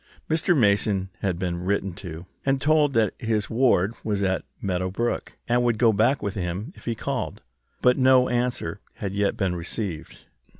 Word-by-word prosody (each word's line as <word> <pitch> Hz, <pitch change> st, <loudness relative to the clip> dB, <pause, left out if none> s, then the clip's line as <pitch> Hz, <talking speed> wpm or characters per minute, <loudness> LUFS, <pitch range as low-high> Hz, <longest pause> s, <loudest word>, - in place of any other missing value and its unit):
Mr. 160 Hz, +2 st, +2 dB
Mason 100 Hz, -4 st, +2 dB
had 95 Hz, -4 st, -1 dB
been 90 Hz, -1 st, -3 dB
written 100 Hz, 0 st, 0 dB
to, 90 Hz, -3 st, -8 dB, 0.2 s
and 135 Hz, 0 st, +1 dB
told 150 Hz, 0 st, +3 dB
that 110 Hz, -4 st, +2 dB
his 110 Hz, -3 st, -1 dB
ward 115 Hz, -4 st, +3 dB
was 100 Hz, -2 st, -1 dB
at 95 Hz, -2 st, 0 dB, 0.2 s
Meadow 95 Hz, -1 st, -1 dB
Brook, 120 Hz, +6 st, -2 dB
and 120 Hz, +1 st, +3 dB
would 120 Hz, -2 st, +2 dB
go 115 Hz, -1 st, +4 dB
back 110 Hz, +6 st, +2 dB
with 100 Hz, -2 st, -2 dB
him 95 Hz, -, -4 dB
if -, -, -16 dB
he 115 Hz, -, -1 dB
called. -, -, -4 dB, 0.4 s
But 125 Hz, +1 st, +4 dB
no 130 Hz, -1 st, +5 dB
answer 120 Hz, -7 st, -1 dB
had 100 Hz, -2 st, -4 dB
yet 100 Hz, +2 st, 0 dB
been 95 Hz, -5 st, 0 dB
received. 85 Hz, 0 st, -5 dB
105 Hz, 175 wpm, -25 LUFS, 95-120 Hz, 0.4 s, no